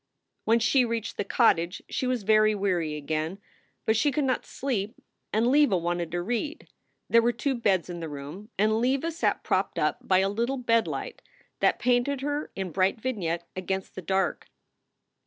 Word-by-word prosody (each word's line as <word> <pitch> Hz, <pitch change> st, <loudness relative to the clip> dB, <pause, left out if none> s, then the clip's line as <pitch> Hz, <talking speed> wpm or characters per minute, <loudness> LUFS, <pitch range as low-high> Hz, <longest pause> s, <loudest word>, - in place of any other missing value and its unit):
When 225 Hz, +1 st, +4 dB
she 240 Hz, +3 st, +3 dB
reached 230 Hz, -2 st, -3 dB
the -, -, 0 dB
cottage 185 Hz, -5 st, +2 dB
she 255 Hz, -, -2 dB
was 250 Hz, -4 st, -1 dB
very 215 Hz, +1 st, +4 dB
weary 180 Hz, -6 st, 0 dB
again. 155 Hz, +4 st, -3 dB, 0.5 s
But 220 Hz, -, +3 dB
she 285 Hz, +7 st, +2 dB
could 290 Hz, +2 st, 0 dB
not 260 Hz, -2 st, -1 dB
sleep 230 Hz, -4 st, -3 dB, 0.4 s
and 220 Hz, +2 st, +2 dB
Leva 265 Hz, -5 st, +4 dB
wanted 175 Hz, 0 st, -2 dB
to 175 Hz, 0 st, -1 dB
read. 245 Hz, -, -3 dB, 0.4 s
There 230 Hz, -, +5 dB
were 235 Hz, +1 st, +2 dB
two 265 Hz, +4 st, -1 dB
beds 200 Hz, -8 st, +1 dB
in 175 Hz, -1 st, -6 dB
the 165 Hz, -1 st, -5 dB
room 150 Hz, +9 st, -8 dB
and 215 Hz, +2 st, +3 dB
Leva 270 Hz, +6 st, +1 dB
sat 330 Hz, -, 0 dB
propped -, -, 0 dB
up -, -, +1 dB
by 185 Hz, -, +2 dB
a 190 Hz, +1 st, +3 dB
little 235 Hz, +7 st, -1 dB
bed 230 Hz, -2 st, +2 dB
light -, -, -5 dB, 0.4 s
that -, -, +3 dB
painted 250 Hz, +3 st, +1 dB
her 290 Hz, +1 st, -2 dB
in 190 Hz, -2 st, -4 dB
bright 190 Hz, +5 st, +1 dB
vignette 175 Hz, -9 st, -2 dB
against 190 Hz, +1 st, -3 dB
the 185 Hz, -, -7 dB
dark. 190 Hz, +1 st, -1 dB
215 Hz, 180 wpm, -27 LUFS, 185-245 Hz, 0.5 s, There